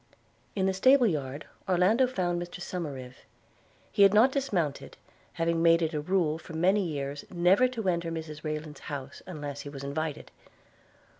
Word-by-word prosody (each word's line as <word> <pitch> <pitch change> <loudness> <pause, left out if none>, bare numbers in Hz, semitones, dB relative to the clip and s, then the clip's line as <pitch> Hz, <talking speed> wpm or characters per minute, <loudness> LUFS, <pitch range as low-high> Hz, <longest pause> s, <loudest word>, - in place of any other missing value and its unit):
In 190 -2 +1
the 190 - +2
stable 255 +7 +5
yard 145 - -2 0.2
Orlando 195 +8 +4
found 175 -7 -1
Mr 175 +1 -7
Somerive. 140 -9 -6 0.7
He - - +1
had 200 +1 +7
not 240 +5 +6
dismounted, 190 - -2 0.4
having 165 0 0
made 165 0 +5
it 160 +1 -1
a 150 - -1
rule 160 -2 +1
for 165 - -11
many 190 +5 +3
years 140 -4 -4
never 185 +7 +4
to 230 -5 -4
enter 170 -2 0
Mrs 155 -2 -6
Rayland's 155 -2 -5
house 140 -1 -6
unless 145 -5 -6
he 145 - -8
was 140 -1 -8
invited. 145 +2 -4
170 Hz, 160 wpm, -29 LUFS, 150-190 Hz, 0.7 s, had